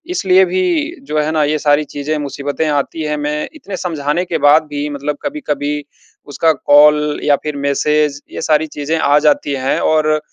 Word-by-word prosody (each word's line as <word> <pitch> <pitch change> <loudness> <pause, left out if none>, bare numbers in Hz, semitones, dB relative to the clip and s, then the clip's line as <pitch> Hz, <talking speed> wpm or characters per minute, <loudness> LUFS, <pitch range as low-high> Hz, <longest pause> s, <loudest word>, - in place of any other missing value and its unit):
इसलिए 370 +1 +4
भी 355 -3 -1
जो 155 - -1
है 150 +1 0
ना, 155 -1 +1
ये 150 +1 +1
सारी 145 0 +2
चीज़ें, 145 +2 -2
मुसीबतें 145 +1 -3
आती 145 +2 -2
हैं। 150 0 -2
मैं 150 +1 -3
इतने 200 -11 -7
समझाने 160 0 -2
के 175 -2 -2
बाद 150 +2 +6
भी 145 0 -3
मतलब 145 0 -4
कभी-कभी 150 - -3 0.4
उसका 160 +3 +1
कॉल 150 0 +4
या 145 - +4
फिर 150 -1 -4
मैसेज, 145 +1 0
ये - - -6
सारी 155 0 +1
चीज़ें 150 +2 -3
आ 145 +1 +3
जाती 285 - +1
हैं - - +1
और 155 -1 +2
150 Hz, 180 wpm, -16 LUFS, 145-160 Hz, 0.4 s, बाद